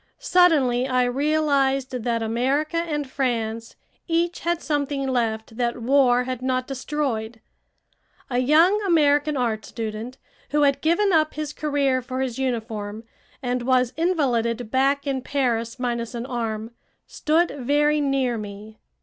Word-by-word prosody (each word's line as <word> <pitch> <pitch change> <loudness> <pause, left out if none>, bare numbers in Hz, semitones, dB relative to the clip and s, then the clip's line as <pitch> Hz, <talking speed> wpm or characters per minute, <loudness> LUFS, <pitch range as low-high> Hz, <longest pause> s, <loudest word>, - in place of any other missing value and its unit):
Suddenly 300 - +3
I 255 -1 +2
realized 275 0 +1
that 235 -2 -1
America 265 +8 0
and 300 -4 -2
France 230 -4 -2 0.3
each 340 +1 0
had 340 0 -1
something 285 -3 -2
left 225 -3 -2
that 240 0 -1
war 250 0 +3
had 255 -1 -4
not 255 0 0
destroyed. 255 -5 -3 0.9
A 245 -1 -1
young 325 +10 +4
American 300 -5 +3
art 225 -4 -1
student, 225 +2 -6 0.3
who 295 +1 +2
had 280 -1 +2
given 350 +5 +2
up 310 -1 +2
his 305 -1 -4
career 285 -4 0
for 255 +1 -4
his 260 -1 -3
uniform, 225 -4 -3 0.4
and 250 0 -1
was 255 0 +2
invalided 245 -9 0
back 275 +2 +2
in 270 -2 -1
Paris 240 -4 -1
minus 240 -2 -3
an 235 0 -4
arm, 225 -3 -3 0.3
stood 325 +3 +1
very 295 +3 +2
near 270 -4 0
me. 210 +1 -9
260 Hz, 135 wpm, -23 LUFS, 235-295 Hz, 0.9 s, young